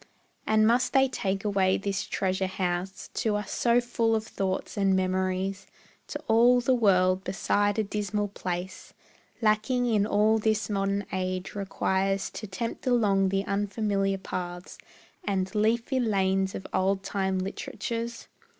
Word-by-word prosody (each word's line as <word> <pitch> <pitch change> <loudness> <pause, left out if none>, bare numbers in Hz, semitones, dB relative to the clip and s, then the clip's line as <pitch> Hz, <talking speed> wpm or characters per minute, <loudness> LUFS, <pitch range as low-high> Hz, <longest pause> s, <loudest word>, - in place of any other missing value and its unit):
And 215 0 +4
must 245 +2 +2
they 270 -1 +5
take 195 -5 -2
away 195 -2 +2
this 195 -1 -2
treasure 190 0 -1
house, 185 0 -3
To 215 -2 0
us 210 -1 -3
so 235 0 +3
full 235 -2 +1
of 220 0 -2
thoughts 190 -3 -3
and 195 -2 +2
memories; 185 +1 -1 0.4
To - - -5
all 240 +2 +5
the 245 +2 +2
world 185 -5 +3
beside 205 +2 0
a 220 - +2
dismal 210 0 -2
place 180 -1 -5 0.5
Lacking 220 +4 +2
in 215 -4 +2
all 215 +1 +3
this 215 0 0
modern 200 0 0
age 185 0 -2
requires 195 -1 -1
To 215 - -7
tempt 230 +6 -5
along 200 -6 +3
the 195 +1 0
unfamiliar 200 -1 0
paths 175 -1 -6 0.4
And 190 -2 -1
leafy 230 +5 +1
lanes 195 -4 +1
of 190 - -6
old 195 +1 +1
time 190 -1 -1
literatures? 230 +5 -4
200 Hz, 140 wpm, -27 LUFS, 190-220 Hz, 0.5 s, they